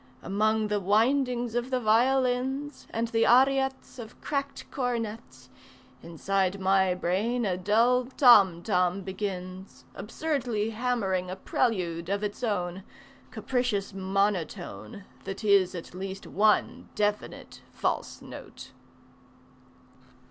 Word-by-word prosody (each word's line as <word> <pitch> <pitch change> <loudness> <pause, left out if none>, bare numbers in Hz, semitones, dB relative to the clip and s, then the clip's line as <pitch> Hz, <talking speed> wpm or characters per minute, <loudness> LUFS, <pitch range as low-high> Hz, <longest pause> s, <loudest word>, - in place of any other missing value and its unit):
Among 215 +2 +1
the 210 0 0
windings 240 +4 +1
of 240 +1 -2
the 255 -1 0
violins 260 +4 +1
And 230 0 -2
the 225 0 0
ariettes 265 +1 +2
Of 225 -1 -10
cracked 280 -1 -4
cornets 235 -4 -4 0.5
Inside 190 +3 -1
my 190 -1 +2
brain 210 +7 -1
a 185 -3 0
dull 230 +7 +2
tom 210 - +5
tom 180 -1 +1
begins 190 -1 -6
Absurdly 235 -1 -2
hammering 215 -6 -1
a 185 - -4
prelude 180 -6 -1
of 200 +1 -1
its 205 +4 -4
own, 185 -4 -2 0.5
Capricious 245 -7 -2
monotone 190 - -2 0.2
That 195 +3 -6
is 200 -3 +3
at 170 - -8
least 190 +1 -6
one 210 +2 +1
definite 210 0 -3
"false - - -3
note." - - -11
210 Hz, 110 wpm, -27 LUFS, 190-245 Hz, 0.5 s, tom